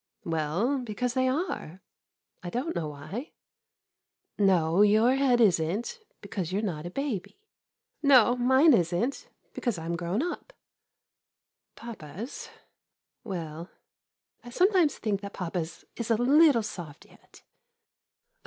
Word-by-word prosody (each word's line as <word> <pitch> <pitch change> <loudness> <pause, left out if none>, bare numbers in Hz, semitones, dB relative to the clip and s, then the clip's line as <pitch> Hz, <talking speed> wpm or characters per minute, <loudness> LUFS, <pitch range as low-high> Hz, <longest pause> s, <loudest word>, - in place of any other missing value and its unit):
Well, 165 - 0
because 245 +1 -3
they 260 0 +1
are 255 - -3 0.3
— - - -52
I 175 - -4
don't 260 - -3
know 160 - -2
why. 155 - -7 1.1
No, 185 -3 +3
your 215 +4 +5
head 265 -3 +3
is 195 -8 +4
n't, 210 - -3 0.2
be - - -10
cause 185 -4 -4
you 190 - -1
're - - -3
not 170 -5 -3
a - - -5
baby. 260 - -4 0.6
No, 255 -5 +6
mine 260 +5 +5
is 175 -6 +2
n't, 235 +10 -2 0.2
because 240 -7 -2
I 165 - -7
'm 170 +1 -2
grown 175 - -1
up. 355 +8 -5 1.2
Papa's? 220 - -8 0.4
— - - -61
well 170 -4 -6 0.4
— - - -49
I 240 - -10
sometimes 360 - +3
think 205 -3 -2
that 200 0 -8
papa's 170 -2 -5
is 235 -1 -5
a 230 - +4
little 270 +1 +5
soft 170 -8 -8
yet. - - -20
215 Hz, 145 wpm, -28 LUFS, 175-255 Hz, 1.2 s, No